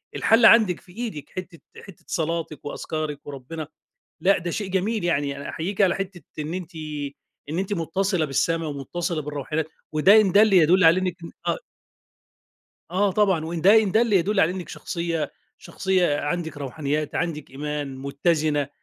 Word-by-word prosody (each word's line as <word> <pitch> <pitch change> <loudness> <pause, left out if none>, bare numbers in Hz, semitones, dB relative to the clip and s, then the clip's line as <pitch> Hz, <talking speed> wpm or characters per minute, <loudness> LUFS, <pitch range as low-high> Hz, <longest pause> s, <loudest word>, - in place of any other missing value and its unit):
الحل 225 +2 +4
عندِك 215 -7 +6
في 180 - -18
إيدِك 210 - -6
حتّة 180 -2 -8 0.2
حتّة 195 -4 -14
صلاتِك 165 -3 -3
وأذكارِك 150 0 -4
وربنا 145 +3 -7 0.5
لأ، 195 +2 +4
ده 175 -1 -4
شيء 205 +4 -3
جميل 200 +2 0
يعني 145 -5 0
أنا 140 - -7
أحييك 190 +6 -4
على 185 -2 +4
حتّة 195 -2 -5 0.2
إن 155 +2 -3
أنتِ 180 -2 -6 0.7
إن 160 +4 -3
أنتِ 195 +2 -2
مُتصلة 180 +1 0
بالسما 165 +4 0
ومُتصلة 155 +3 -3
بالروحانيات، 150 +2 -3 0.3
وده 195 +8 +6
إن 195 -4 +2
دل 215 +1 +6
يدل 180 +1 +5
على 165 +3 +6
إنِّك 180 -2 -2 0.3
أ - - +1 1.3
آه، 195 +2 +2
طبعًا 190 -6 +2
وإن 165 0 -4
ده 210 +5 +7
إن 195 - -2
دلّ 225 0 +3
يدلّ 195 +2 +3
على 165 - +4
إنِّك 185 -1 -6
شخصية 170 -3 -3 0.3
شخصية 185 -6 0
عندِك 160 0 -3
روحانيات، 145 +2 -3
عندِك 160 -4 -3
إيمان، 145 -1 -4
متّزنة، 145 +1 0
170 Hz, 155 wpm, -24 LUFS, 150-190 Hz, 1.3 s, ده